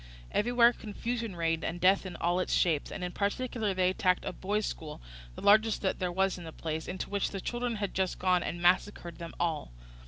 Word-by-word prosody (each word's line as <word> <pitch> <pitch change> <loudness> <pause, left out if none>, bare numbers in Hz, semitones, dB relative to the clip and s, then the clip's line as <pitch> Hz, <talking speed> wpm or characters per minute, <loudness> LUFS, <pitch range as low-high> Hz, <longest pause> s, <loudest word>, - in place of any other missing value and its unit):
Everywhere 240 +2 +4
confusion 230 -1 -4
reigned 165 -1 0
and 170 +2 -3
death 190 +2 +4
in 180 - -7
all 175 +2 +1
its 185 - -1
shapes; 160 -5 +1
and 185 - -5
in 180 - -2
particular 210 +1 -1
they 185 0 +3
attacked 185 -1 +1
a - - -3
boys' 205 +2 -1
school, 155 -2 -6 0.4
the - - -9
largest 215 +2 +4
that 190 - 0
there 180 -1 -1
was 190 +1 +1
in - - -9
the 160 - -7
place, 160 0 -4
into 185 - -4
which 200 -1 0
the 195 - -5
children 240 +3 -2
had 200 -2 -3
just 190 -1 0
gone, 180 -1 +2
and 175 - -4
massacred 175 -1 +1
them 170 -1 -7
all. 160 - -1
185 Hz, 215 wpm, -30 LUFS, 175-210 Hz, 0.4 s, Everywhere